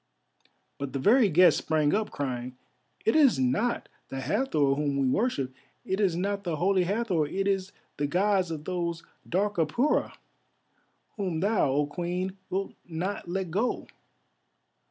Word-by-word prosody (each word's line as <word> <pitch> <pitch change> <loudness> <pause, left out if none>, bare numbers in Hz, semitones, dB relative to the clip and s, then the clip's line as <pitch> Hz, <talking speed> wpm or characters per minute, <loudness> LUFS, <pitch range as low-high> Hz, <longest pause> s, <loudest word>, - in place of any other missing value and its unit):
But 140 -1 -4
the - - -1
very 220 - +5
guests 180 +2 +5
sprang 155 -2 +1
up 215 +1 0
crying, 125 -2 -4 0.5
"It 220 - +3
is 290 -6 +5
not 130 - 0 0.2
the 135 - -4
Hathor 145 - +1
whom 140 0 -1
we 135 -1 +2
worship, 135 - 0 0.3
it 190 - -1
is 190 -5 +2
not 200 +3 -1
the 170 -4 -2
Holy 185 +3 +2
Hathor, 190 -6 0
it 195 +6 -2
is 195 0 0 0.3
the 145 - 0
Gods 185 +2 +2
of 155 -2 -5
those 170 -2 -2 0.3
dark 200 +3 0
Apura 165 - +1 1.0
whom 185 -6 -2
thou, 200 -5 +2
O 145 +2 +2
Queen, 180 +4 -3
wilt 195 +1 -2
not 175 +2 -4
let 185 -1 -2
go. 215 +8 0
180 Hz, 150 wpm, -28 LUFS, 150-200 Hz, 1.0 s, very